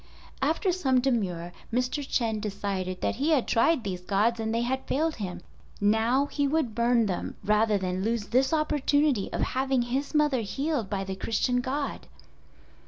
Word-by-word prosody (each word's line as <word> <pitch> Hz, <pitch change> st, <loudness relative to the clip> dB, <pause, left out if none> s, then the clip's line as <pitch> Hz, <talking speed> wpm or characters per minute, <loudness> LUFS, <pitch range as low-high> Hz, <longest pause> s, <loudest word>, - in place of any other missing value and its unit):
After 320 Hz, +7 st, +1 dB
some 270 Hz, -8 st, +2 dB
demur 190 Hz, -10 st, -1 dB, 0.2 s
Mr. 250 Hz, +4 st, 0 dB
Chen 230 Hz, -5 st, 0 dB
decided 195 Hz, -3 st, -3 dB
that -, -, -1 dB
he 285 Hz, +5 st, 0 dB
had 295 Hz, -6 st, +2 dB
tried 255 Hz, +3 st, +3 dB
these 185 Hz, -3 st, -4 dB
gods 210 Hz, +5 st, +1 dB
and 220 Hz, 0 st, -1 dB
they 230 Hz, +1 st, 0 dB
had 265 Hz, +2 st, -2 dB
failed 315 Hz, +3 st, 0 dB
him, 180 Hz, -4 st, -5 dB, 0.4 s
now 225 Hz, +6 st, +3 dB
he 285 Hz, 0 st, -1 dB
would 275 Hz, -6 st, 0 dB
burn 235 Hz, 0 st, +3 dB
them 185 Hz, -4 st, -3 dB
rather 210 Hz, 0 st, +3 dB
than 185 Hz, -1 st, -2 dB
lose 225 Hz, -1 st, -1 dB
this 260 Hz, +2 st, +3 dB
opportunity 295 Hz, -6 st, +1 dB
of -, -, -2 dB
having 265 Hz, -1 st, +1 dB
his 270 Hz, +5 st, -3 dB
mother 295 Hz, -5 st, +3 dB
healed 270 Hz, +1 st, -2 dB
by 195 Hz, -1 st, -2 dB
the 190 Hz, 0 st, -4 dB
Christian 240 Hz, +5 st, 0 dB
God! 275 Hz, +3 st, -3 dB
240 Hz, 170 wpm, -27 LUFS, 205-275 Hz, 0.4 s, tried